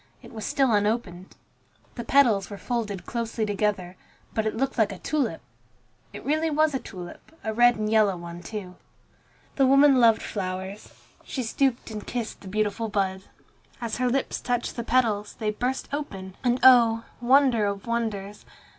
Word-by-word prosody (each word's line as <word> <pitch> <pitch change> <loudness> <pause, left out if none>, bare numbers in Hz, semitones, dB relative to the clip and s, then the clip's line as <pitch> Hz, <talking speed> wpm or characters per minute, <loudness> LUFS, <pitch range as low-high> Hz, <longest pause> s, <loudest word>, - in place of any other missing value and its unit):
It - - -13
was 220 -2 -6
still 270 -3 +2
unopened. 205 -3 -1 0.6
The 235 - -6
petals 235 -7 +3
were 205 - -7
folded 210 -6 -3
closely 230 -1 -2
together, 200 -3 -1 0.4
but 220 -1 0
it 215 - -3
looked 270 0 -1
like 215 -2 +3
a 195 - -7
tulip. 260 - -2 0.7
It - - -10
really 310 +3 +1
was 310 0 +2
a 265 - 0
tulip, 185 - -10
a 220 - -2
red 240 +1 +5
and 215 0 -2
yellow 215 -4 +3
one, 170 0 -8
too. 185 0 -7 0.8
The 270 -2 +4
woman 275 0 +6
loved 230 -2 +5
flowers. 190 0 -5 0.3
She 260 - -4
stooped 240 0 0
and 210 -1 -7
kissed 235 -3 -4
the 195 - -11
beautiful 215 +2 -1
bud. 190 -2 -1 0.5
As 230 -2 -3
her 250 0 +1
lips 265 +2 -1
touched 245 -1 -2
the 235 - -3
petals, 225 -4 +1
they 215 -1 -1
burst 250 +5 -2
open, 195 -11 -5
and 245 0 +2
oh! 230 -3 +6 0.2
wonder 250 -4 +4
of 200 -1 -4
wonders! 215 -4 -3
225 Hz, 165 wpm, -26 LUFS, 200-250 Hz, 0.8 s, woman